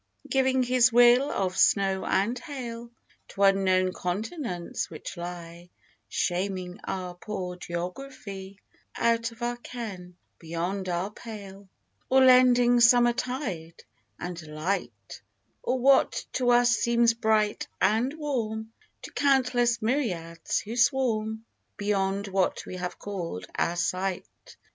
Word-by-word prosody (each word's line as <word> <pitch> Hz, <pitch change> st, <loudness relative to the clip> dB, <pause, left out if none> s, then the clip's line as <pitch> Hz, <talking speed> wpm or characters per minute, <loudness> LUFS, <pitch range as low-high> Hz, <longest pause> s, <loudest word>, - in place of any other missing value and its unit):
Giving 265 Hz, -1 st, +2 dB
His 250 Hz, -1 st, +4 dB
will 245 Hz, +4 st, +6 dB
of 185 Hz, -2 st, -1 dB
snow 195 Hz, -1 st, +3 dB
and 230 Hz, +6 st, +1 dB
hail 240 Hz, -5 st, -7 dB, 0.4 s
To 200 Hz, -, -2 dB
unknown 185 Hz, -2 st, +3 dB
continents, 185 Hz, -, -4 dB
which 155 Hz, -, -8 dB
lie 175 Hz, 0 st, -8 dB, 0.4 s
(Shaming 180 Hz, 0 st, -2 dB
our 180 Hz, -2 st, -4 dB
poor 180 Hz, -1 st, -5 dB
geography), 190 Hz, +2 st, -7 dB, 0.4 s
Out 230 Hz, 0 st, +1 dB
of 230 Hz, +1 st, -10 dB
our 240 Hz, 0 st, -1 dB
ken, 200 Hz, -8 st, -8 dB
— -, -, -48 dB
beyond 175 Hz, +4 st, -3 dB
our 180 Hz, +3 st, -2 dB
pale 200 Hz, -3 st, -10 dB, 0.2 s
— -, -, -44 dB
Or 265 Hz, 0 st, +6 dB
lending 245 Hz, -1 st, +6 dB
summer 240 Hz, 0 st, +6 dB
tide 235 Hz, -, -5 dB, 0.3 s
and 175 Hz, -1 st, -6 dB
light 150 Hz, -, -4 dB, 0.4 s
Or 255 Hz, -, 0 dB
what 270 Hz, +2 st, +3 dB
to 250 Hz, -1 st, +1 dB
us 240 Hz, 0 st, +5 dB
seems 235 Hz, 0 st, +3 dB
bright 220 Hz, -2 st, +1 dB
and 225 Hz, +5 st, +2 dB
warm, 225 Hz, -8 st, -3 dB, 0.3 s
To -, -, -8 dB
countless 250 Hz, -4 st, +2 dB
myriads, 180 Hz, -, -1 dB
who 225 Hz, +3 st, -6 dB
swarm 225 Hz, -3 st, +1 dB, 0.3 s
Beyond 200 Hz, -1 st, -1 dB
what 190 Hz, -1 st, 0 dB
we 185 Hz, -, -7 dB
have 180 Hz, 0 st, -5 dB
called 170 Hz, -, -5 dB
our 170 Hz, -, 0 dB
sight. 185 Hz, +1 st, -1 dB
210 Hz, 125 wpm, -27 LUFS, 180-245 Hz, 0.4 s, will